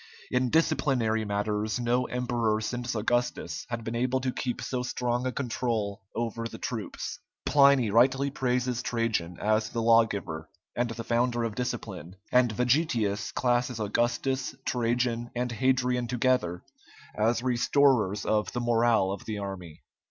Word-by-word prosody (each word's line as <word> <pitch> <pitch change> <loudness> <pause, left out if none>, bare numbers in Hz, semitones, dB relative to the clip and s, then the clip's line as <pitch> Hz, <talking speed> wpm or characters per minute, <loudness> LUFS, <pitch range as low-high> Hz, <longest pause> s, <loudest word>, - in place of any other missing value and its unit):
In 125 0 +2
disciplinary 120 -8 +2
matters 105 +2 -1
no 125 +1 +1
emperor 120 -3 0
since 120 +2 -3
Augustus 115 -6 -1
had 115 -1 -4
been 115 - -4
able 125 +2 +1
to 130 0 -1
keep 125 -1 -3
so 125 -1 -2
strong 125 0 -1
a - - -1
control 115 -5 -2
over 115 0 -2
the - - -9
troops. - - -5 0.3
Pliny 140 -6 +5
rightly 135 +5 +3
praises 125 -2 0
Trajan 115 -9 -1
as 110 +2 +1
the 115 - -3
lawgiver 105 -9 +2 0.3
and 120 0 0
the 115 0 -5
founder 120 0 +1
of 115 -2 -2
discipline, 95 -7 -5 0.2
and 125 -2 +4
Vegetius 120 -4 +1
classes 120 -1 0
Augustus, 120 +5 0
Trajan, 120 0 0
and 125 0 -1
Hadrian 125 0 +1
together 125 -8 0 0.5
as 115 +3 +1
restorers 125 -4 +2
of 105 -1 +1
the 120 - -1
morale 115 -4 +3
of 100 - -6
the 110 -2 -4
army. 95 -5 -7
120 Hz, 140 wpm, -28 LUFS, 110-125 Hz, 0.5 s, Pliny